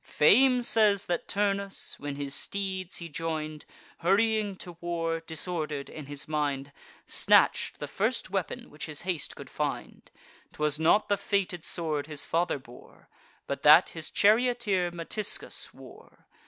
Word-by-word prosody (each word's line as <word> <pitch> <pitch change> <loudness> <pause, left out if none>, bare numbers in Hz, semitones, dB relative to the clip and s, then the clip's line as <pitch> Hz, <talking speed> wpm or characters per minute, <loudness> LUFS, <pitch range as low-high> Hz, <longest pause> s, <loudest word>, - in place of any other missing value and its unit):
Fame 250 - +5
says 210 -4 +3
that 175 - -2
Turnus, 200 -1 -1
when 145 0 -4
his 140 -1 -5
steeds 190 -1 -3
he 170 - -6
join'd, 155 -1 -4 0.3
Hurrying 205 +2 +2
to 180 -1 -9
war, 165 -1 -1
disorder'd 160 -3 -4
in 150 -3 -8
his 145 -1 -6
mind, 145 -2 -1 0.3
Snatch'd - - +3
the - - -4
first - - -1
weapon - - -3
which 150 - -7
his 150 -2 -6
haste 175 -4 -3
could - - -9
find. - - -4 0.4
'Twas 150 0 -1
not 165 +7 +4
the 205 - +2
fated 195 -5 -1
sword 155 -4 -1
his 150 -2 -4
father 170 -1 +1
bore, 125 -2 -16 0.4
But - - -4
that - - +8
his 160 -1 -5
charioteer 215 -4 +3
Metiscus 175 +5 -3
wore. - - -16
170 Hz, 140 wpm, -29 LUFS, 150-200 Hz, 0.4 s, that